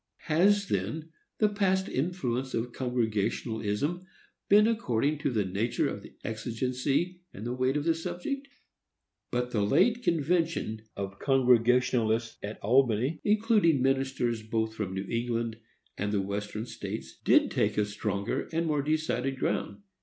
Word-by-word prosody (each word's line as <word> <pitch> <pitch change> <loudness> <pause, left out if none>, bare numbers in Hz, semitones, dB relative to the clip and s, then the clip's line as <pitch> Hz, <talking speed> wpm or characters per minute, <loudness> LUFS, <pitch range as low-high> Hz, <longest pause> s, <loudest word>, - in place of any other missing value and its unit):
Has, 200 +6 +3
then, 150 - -2 0.3
the 215 - +4
past 195 -2 +1
influence 130 -5 -2
of 120 +1 -2
Congregationalism 115 - -1 0.5
been 210 +1 +7
according 150 - 0
to 145 - 0
the 110 -6 0
nature 100 +6 0
of - - -4
the - - -14
exigency 130 +10 -1
and 105 - -8
the 120 - -2
weight 130 +2 +1
of 145 - -1
the 165 +1 +3
subject? 180 - -4 0.8
But 125 0 -1
the 105 - +1
late 225 - +3
convention 165 - 0 0.2
of 100 0 -5
Congregationalists 125 -3 +3
at 105 +1 -6
Albany, 125 +4 +2
including 210 - +3
ministers 130 -3 0
both 110 0 -1
from 100 -4 -4
New 95 +1 -3
England 115 -1 -1 0.4
and 100 +1 -1
the 105 - +1
Western 105 +2 -4
States, 115 -2 -7
did - - +4
take - - +1
a 105 - +3
stronger 105 +4 -2
and 165 +1 0
more 150 -3 +1
decided 140 -3 -1
ground. 100 -5 -2
125 Hz, 140 wpm, -29 LUFS, 110-160 Hz, 0.8 s, been